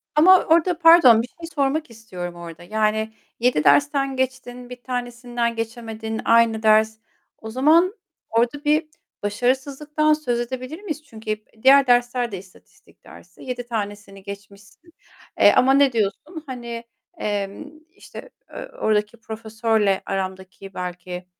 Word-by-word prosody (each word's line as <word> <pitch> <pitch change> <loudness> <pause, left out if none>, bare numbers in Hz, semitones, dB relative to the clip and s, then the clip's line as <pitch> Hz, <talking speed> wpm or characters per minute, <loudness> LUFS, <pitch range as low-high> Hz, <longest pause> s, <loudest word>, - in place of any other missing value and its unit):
Ama 365 +4 +6
orada 335 +2 +3
pardon, 330 -9 +7
bir 235 - -6
şey 330 +6 -11
sormak 285 +1 0
istiyorum 185 -6 -8
orada. 170 -1 -10
Yani, 220 +3 -1 0.3
7 240 -10 +2
dersten 280 -2 +3
geçtin, 255 -1 -4
1 250 0 -10
tanesinden 245 -1 -3
geçemedin. 225 -1 -5
Aynı 230 -1 +3
ders. 220 0 +4 0.4
O 220 - -9
zaman 315 - +3 0.4
orada 235 +6 0
bir 305 +1 +2 0.4
başarısızlıktan 270 +8 0
söz 250 -6 -1
edebilir 255 +7 -6
miyiz? 310 -6 -5
Çünkü 220 -5 -7
hep 215 0 -6
diğer 275 +1 +6
dersler 245 -1 +2
de 195 - -5
istatistik 185 0 -19
dersi. - - -16
7 245 -2 -5
tanesini 205 -3 -6
geçmişsin. 205 - -12 0.5
Eee, - - +7
ama 265 +1 +4
ne 275 -1 +4
diyorsun? 235 - -3
Hani, 235 -3 -7 0.3
emm, 205 +7 -4 0.2
işte, - - -12 0.2
eee, - - -8
oradaki 210 +1 0
profesörle 220 -2 -1
aramdaki 190 0 -6
belki, 180 0 -6
235 Hz, 130 wpm, -22 LUFS, 215-270 Hz, 0.5 s, pardon